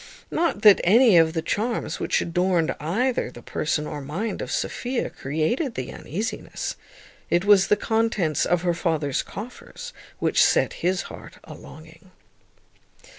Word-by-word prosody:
Not 330 -11 0
that 210 -2 +8
any 225 +3 +6
of 160 -1 +3
the 160 -2 -2
charms 225 +2 -2
which - - 0
adorned 175 -1 +1
either 220 - 0
the 120 -1 -13
person 150 0 -2
or 150 -1 -5
mind 175 +11 -4
of - - -5
Sophia 250 0 -2
created 160 - -2
the 130 - -5
uneasiness; 210 - -5 0.5
it 175 +2 +1
was 205 -2 +6
the - - +4
contents 215 -7 0
of 175 0 +1
her 175 -1 +2
father's 155 -5 -1
coffers 250 - -9 0.2
which - - +3
set - - +2
his 180 +1 0
heart - - -11
a - - -10
longing. 160 +3 -14
180 Hz, 145 wpm, -24 LUFS, 160-225 Hz, 0.5 s, that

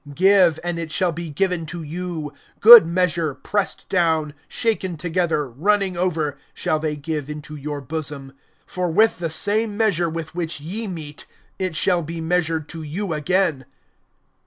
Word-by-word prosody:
(38)Give, 180 +1 +4
and 175 -1 -2
it 165 -2 -5
shall 180 +1 +1
be 170 0 -6
given 175 +1 -1
to 170 +1 -6
you; 160 -1 -5 0.3
good 230 -5 +10
measure, 170 -4 0
pressed 205 - -2
down, 160 -5 +1
shaken 195 -7 -1
together, 165 -2 0
running 190 - 0
over, 160 -6 -1 0.2
shall 160 -4 0
they 155 -1 -2
give 150 -1 -4
into 150 0 -7
your 145 0 -5
bosom. 145 -1 -6 0.3
For 180 -1 -2
with 215 +6 +3
the 170 -2 -2
same 205 +5 0
measure 190 -7 +2
with 160 0 -6
which 165 -3 -3
ye 200 +10 -4
mete 155 -5 -8 0.3
it 185 -3 -2
shall 175 +1 +2
be 165 +1 -6
measured 160 -2 0
to 165 - -7
you 165 +4 -4
again. 155 -2 0
165 Hz, 160 wpm, -22 LUFS, 155-185 Hz, 0.3 s, good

